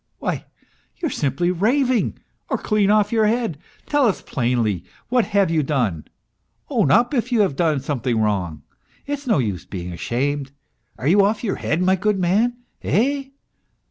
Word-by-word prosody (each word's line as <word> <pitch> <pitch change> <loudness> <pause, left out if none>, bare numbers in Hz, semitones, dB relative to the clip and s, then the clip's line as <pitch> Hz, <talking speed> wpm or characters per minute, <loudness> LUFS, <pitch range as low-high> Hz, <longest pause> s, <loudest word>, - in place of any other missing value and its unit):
" - - -47
Why, - - -3 0.5
you 325 - -2
are - - -7
simply 145 +5 0
raving, 245 +6 +1 0.3
or - - +1
clean 210 -2 +1
off 210 0 +3
your 220 -2 +3
head! 225 -9 -1 0.3
Tell 290 -3 +3
us 205 - -1
plainly, 120 - 0 0.3
what 245 -1 +3
have 200 -4 +2
you 160 -2 +2
done? 125 - -1 0.7
Own - - +2
up 240 - +4
if 245 -1 0
you 235 -3 +4
have 190 -9 +1
done 155 -3 +1
something 125 -4 -1
wrong! 90 -9 -1 0.4
It's 285 -1 -4
no 225 - +3
use 100 - -1
being 90 -2 -6
ashamed! 135 +8 -2 0.4
Are 130 - -3
you 200 +5 +5
off 210 +3 +1
your 205 - -1
head, 165 +4 0
my 190 +1 +4
good 210 +2 0
man, 210 +7 +2 0.2
eh 275 +5 +1
180 Hz, 175 wpm, -21 LUFS, -, 0.7 s, you